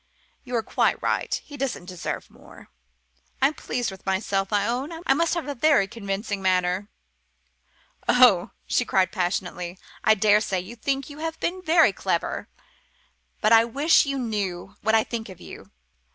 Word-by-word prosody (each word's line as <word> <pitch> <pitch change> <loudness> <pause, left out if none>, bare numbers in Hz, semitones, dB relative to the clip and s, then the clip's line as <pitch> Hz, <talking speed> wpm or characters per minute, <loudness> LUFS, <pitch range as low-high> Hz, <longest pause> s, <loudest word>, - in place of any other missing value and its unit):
You're 245 -3 -2
quite - - +1
right - - -1
he 290 - -10
doesn't 260 -10 -3
deserve 180 -2 -5
more! - - -16 0.7
I - - +4
am - - -8
pleased 245 -6 -3
with 190 - -12
myself, 195 +1 -1
I 205 -1 +2
own. 255 +7 -2
I - - +4
must 335 +4 +1
have 330 -5 -3
a 285 - -2
very 280 -6 +3
convincing 200 -2 -4
manner." 185 +1 +1 1.2
"Oh," 245 -8 +6 0.2
she - - +1
cried 190 -6 +1
passionately, 180 -1 -3 0.3
"I 220 - +5
daresay 210 -2 +3
you 190 +6 -8
think 270 +3 -2
you've 320 +2 -5
been 370 +2 -2
very 330 -1 +4
clever. - - -2 0.9
But 215 +1 +4
I 225 0 +8
wish 285 +6 +3
you 275 0 -1
knew 200 -6 -3
what 220 0 +2
I 220 - +4
think 225 -3 -5
of 185 - -11
you. - - -11
220 Hz, 160 wpm, -25 LUFS, 195-270 Hz, 1.2 s, I